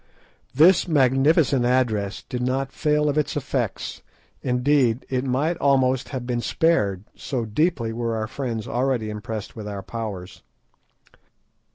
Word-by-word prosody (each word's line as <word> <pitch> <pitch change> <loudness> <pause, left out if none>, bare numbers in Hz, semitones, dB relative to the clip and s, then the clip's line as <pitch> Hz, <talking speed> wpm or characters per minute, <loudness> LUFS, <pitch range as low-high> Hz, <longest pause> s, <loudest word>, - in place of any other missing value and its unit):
This 170 +7 +5
magnificent 135 -1 +3
address 115 -5 0
did 125 - -5
not 130 +2 -1
fail 150 +1 +1
of 145 +1 +1
its 150 - -2
effect; 135 -7 -3 0.4
indeed, 125 -1 +2
it 130 -1 0
might 140 +6 0
almost 130 -3 +2
have 130 -3 -5
been 120 -1 -1
spared, 105 - +1
so 125 -4 -3
deeply 115 0 0
were 115 0 -2
our 110 0 -2
friends 115 -2 -4
already 125 -4 -1
impressed 105 0 -6
with 110 -2 -7
our 100 -2 -5
powers. 100 -3 -6
125 Hz, 135 wpm, -23 LUFS, 110-140 Hz, 0.4 s, This